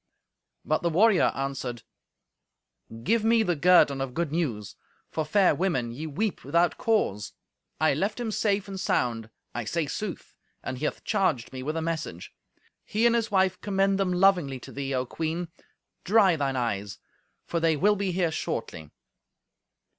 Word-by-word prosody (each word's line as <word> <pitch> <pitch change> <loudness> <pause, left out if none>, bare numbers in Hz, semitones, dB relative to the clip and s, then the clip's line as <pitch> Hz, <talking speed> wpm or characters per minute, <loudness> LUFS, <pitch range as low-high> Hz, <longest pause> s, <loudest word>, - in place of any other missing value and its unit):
But 155 - +1
the 170 - +1
warrior 195 +4 +4
answered, 135 -4 -4 1.2
"Give 225 +2 +2
me 225 0 +4
the 175 -5 0
guerdon 150 -4 +4
of 135 -2 -4
good 170 -3 -1
news, 120 - -2 0.4
for, 160 - -1
fair 190 +5 +3
women, 160 -11 -1
ye 150 +7 -6
weep 195 +8 -2
without 170 +1 +2
cause. 105 - 0 0.5
I 155 -1 +3
left 200 - -1
him 235 -2 -2
safe 205 -1 0
and 195 -1 -6
sound—I 115 -4 -2
say 165 +7 -1
sooth—and 145 -6 -7
he 155 - -2
hath - - -3
charged 185 - 0
me 130 - -5
with 155 +5 -3
a 165 - -2
message. 155 - -4 0.5
He 220 +3 0
and 235 - +5
his 225 -2 0
wife 190 -2 +1
commend 195 -1 +1
them 190 -2 +1
lovingly 180 -7 +3
to - - -10
thee, 140 0 -4
O 130 0 0
Queen. 165 +5 -3 0.5
Dry 200 -3 +4
thine 140 -3 -1
eyes, 105 -5 -2 0.5
for 170 - -2
they 165 -2 +2
will 210 +8 +3
be 195 -2 -1
here 175 -2 0
shortly." 80 - -4
165 Hz, 160 wpm, -27 LUFS, 135-195 Hz, 1.2 s, and